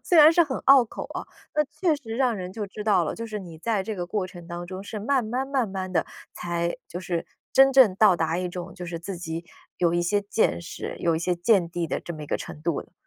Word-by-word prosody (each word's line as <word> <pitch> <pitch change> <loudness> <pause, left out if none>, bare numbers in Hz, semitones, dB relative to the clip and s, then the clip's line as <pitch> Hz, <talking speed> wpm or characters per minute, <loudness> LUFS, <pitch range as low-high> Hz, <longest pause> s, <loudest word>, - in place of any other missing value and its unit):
虽 350 - +3
然 310 0 +9
是 340 0 +5
很 270 -4 -3
拗 270 -2 +8
口 220 - -7
啊， - - -4 0.3
那 300 - +4
确 320 +2 0
实 230 -6 -7
让 250 -4 +2
人 185 -1 -6
就 215 +1 -4
知 205 +1 -7
道 200 -5 +4
了， 160 - -1
就 230 - -5
是 215 -2 -5
你 170 -4 -10
在 210 +3 0
这 210 +2 -4
个 175 -1 -3
过 195 +1 -1
程 175 -2 -10
当 175 0 -5
中 185 0 -6
是 210 +1 -5
慢 255 +2 +1
慢 255 +5 -2
慢 265 -5 +1
慢 190 -1 -4
地 165 - +1 0.3
才 170 0 -2
就 175 - -6
是 175 -2 -3 0.3
真 270 0 +7
正 255 -8 +7
到 205 -2 +6
达 165 +1 0
一 180 0 -2
种 175 0 -6
就 180 -1 -7
是 170 -1 -4
自 185 +3 -6
己 165 -1 -5 0.3
有 170 -2 +3
一 175 - +2
些 205 +4 +2
见 200 +2 +1
识， 170 - -6
有 170 -1 +1
一 - - 0
些 175 +2 0
见 175 0 +3
地 170 0 -2
的 - - -2
这 170 - -6
么 155 - -8
一 - - -7
个 - - 0
程 150 - -8
度 170 -3 0
了。 - - -15
190 Hz, 290 characters per minute, -26 LUFS, 175-230 Hz, 0.3 s, 然